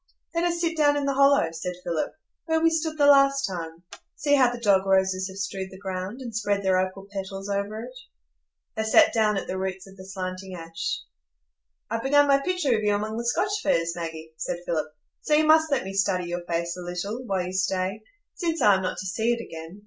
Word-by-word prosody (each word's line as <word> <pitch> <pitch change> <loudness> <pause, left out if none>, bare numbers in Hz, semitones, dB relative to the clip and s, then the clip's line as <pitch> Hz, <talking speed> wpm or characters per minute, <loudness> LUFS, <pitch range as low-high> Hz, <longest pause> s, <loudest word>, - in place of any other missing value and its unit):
"Let 335 +1 +1
us 345 -1 0
sit 335 -1 0
down 290 -2 +3
in 285 - -1
the 280 - +1
hollow," 275 -9 +4
said 170 +2 -5
Philip, 170 -3 -2 0.3
"where 320 -1 +1
we 330 0 +3
stood 320 -1 -1
the 290 - +4
last 275 -1 +5
time. 170 -3 -6 0.3
See 290 0 0
how 260 -4 +5
the 245 - -6
dog 200 -4 +3
roses 190 0 +2
have 190 0 -10
strewed 195 -1 -4
the 190 - -12
ground, 190 +4 -5
and 235 -4 -7
spread 205 -2 0
their 190 -1 +3
opal 190 +1 -3
petals 195 0 -5
over 200 +2 -2
it." - - -9 0.8
They 220 - -1
sat 220 - +5
down 215 -2 +2
at - - -3
the 185 - -4
roots 190 -1 -4
of 195 0 -15
the 190 - -10
slanting 185 0 -5
ash. 165 -1 -4 0.9
"I've 230 0 -1
begun 290 +2 +4
my 275 -1 +5
picture 295 -5 +1
of 215 - -1
you 205 -1 +2
among 215 +1 -3
the 235 0 -3
Scotch 410 - 0
firs, 170 - +1
Maggie," 160 -2 -6
said 175 +2 -4
Philip, 155 -2 -2 0.3
"so 300 - +2
you 310 - +4
must 315 0 +5
let 275 - +1
me 195 +1 -6
study 195 -2 +1
your 175 0 -3
face 170 0 -2
a 180 - -8
little, 180 +7 -4
while 190 -3 0
you 180 - -5
stay,—since 215 - -3
I 205 - +6
am 190 - +1
not 185 - -3
to 190 - -5
see 220 +5 +1
it 235 - -3
again. 165 +4 -9
200 Hz, 225 wpm, -25 LUFS, 185-275 Hz, 0.9 s, I